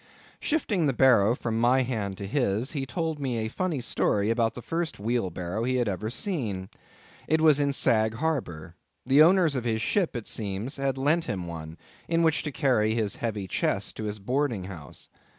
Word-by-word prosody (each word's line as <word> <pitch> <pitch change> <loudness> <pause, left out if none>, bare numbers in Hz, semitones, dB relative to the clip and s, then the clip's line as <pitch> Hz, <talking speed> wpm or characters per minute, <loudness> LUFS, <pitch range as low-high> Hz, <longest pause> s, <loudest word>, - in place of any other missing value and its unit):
Shifting 210 - 0
the 135 - +1
barrow 120 -3 +5
from 115 -3 -2
my 130 +2 +4
hand 105 -6 -3
to 100 - -5
his, 115 +1 0
he 135 -3 -3
told 160 +2 -2
me 130 -4 -2
a 110 0 -2
funny 170 -1 -2
story 105 -2 +1
about 115 -1 +1
the 125 - -7
first 165 -1 -2
wheelbarrow 100 -3 -2
he 130 +1 0
had 120 -2 +1
ever 105 +2 -2
seen. 115 - -3 0.6
It 160 +1 +3
was 155 -2 +5
in 140 -1 +2
Sag 110 -4 +2
Harbor. 115 - -3 0.3
The 135 +4 +5
owners 170 -2 +5
of 125 - -1
his 115 -2 0
ship, 185 -9 0
it 120 -3 -5
seems, 105 +6 -4
had 135 -1 -1
lent 155 +5 +2
him 95 - -3
one, 80 -1 -7 0.3
in 165 0 +2
which 160 -1 +3
to 150 - -4
carry 110 -6 +2
his 110 -3 -1
heavy 105 -4 -3
chest - - -1
to 110 - -4
his 105 0 -3
boarding 125 0 -1
house. 85 -7 -9
120 Hz, 190 wpm, -27 LUFS, 105-145 Hz, 0.6 s, barrow